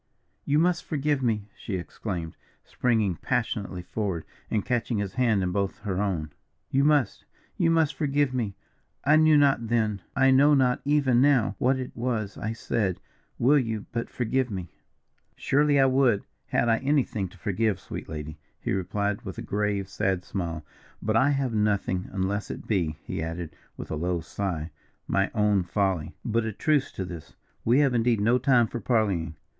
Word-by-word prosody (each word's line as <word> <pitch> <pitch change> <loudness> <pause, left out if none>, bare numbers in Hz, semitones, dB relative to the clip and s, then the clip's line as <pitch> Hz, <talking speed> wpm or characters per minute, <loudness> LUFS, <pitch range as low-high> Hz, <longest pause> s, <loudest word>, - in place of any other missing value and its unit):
"You 145 - +2
must 175 +2 +2
forgive 145 -2 0
me," 110 -5 0
she 100 - -5
exclaimed, 85 -2 -5 0.3
springing 110 -8 0
passionately 105 -7 -2
forward, 95 -4 -3 0.2
and 105 -3 0
catching 120 -2 0
his 100 -2 -2
hand 115 -6 +2
in 90 - -1
both 100 +1 -1
her 95 -2 -2
own, 85 -7 -2 0.4
"you 135 +1 +3
must 145 -7 +2 0.3
you 165 - +2
must 165 -3 +3
forgive 145 -3 +1
me. 110 -6 -2 0.5
I 150 +2 +6
knew 155 -1 +6
not 135 -5 +3
then, 110 -4 0
I 135 0 +5
know 145 +3 +6
not 125 -2 +2
even 140 -4 +3
now, 130 -8 +4
what 130 +2 +3
it 130 -1 -6
was 115 -4 -2
I 110 - -3
said 105 -4 -1 0.4
will 140 +4 +5
you 115 -4 -3
but 115 0 -3
forgive 125 +1 0
me?" 95 -5 -5 0.6
"Surely 145 0 +2
I 135 - +6
would, 130 -5 +3 0.2
had - - +1
I 115 -1 +4
anything 135 -8 0
to 95 - -17
forgive, 105 +3 0
sweet - - -8
lady," 75 -1 -6 0.2
he - - -3
replied, 100 +2 -1
with 95 - -7
a - - -5
grave, 100 -1 -1
sad 95 -1 -1
smile. 85 -5 -4 0.3
"But 110 +1 -1
I 135 +4 +4
have 135 -4 0
nothing, 100 -3 0
unless 100 +1 -2
it - - -6
be," 85 -8 0
he - - -4
added, 80 +1 -5 0.2
with - - -7
a - - -1
low 85 +3 -1
sigh, 85 -1 -4 0.4
"my 100 0 +1
own 105 -2 +3
folly. 90 -3 -1
But 115 0 +1
a 110 - -3
truce 150 +4 +1
to 95 - -4
this, 85 -4 -9 0.3
we 125 +5 +4
have 140 -3 +3
indeed 115 -1 +2
no 120 +5 +3
time 125 -2 +4
for 120 - -5
parleying. 100 -10 0
110 Hz, 175 wpm, -26 LUFS, 95-130 Hz, 0.6 s, I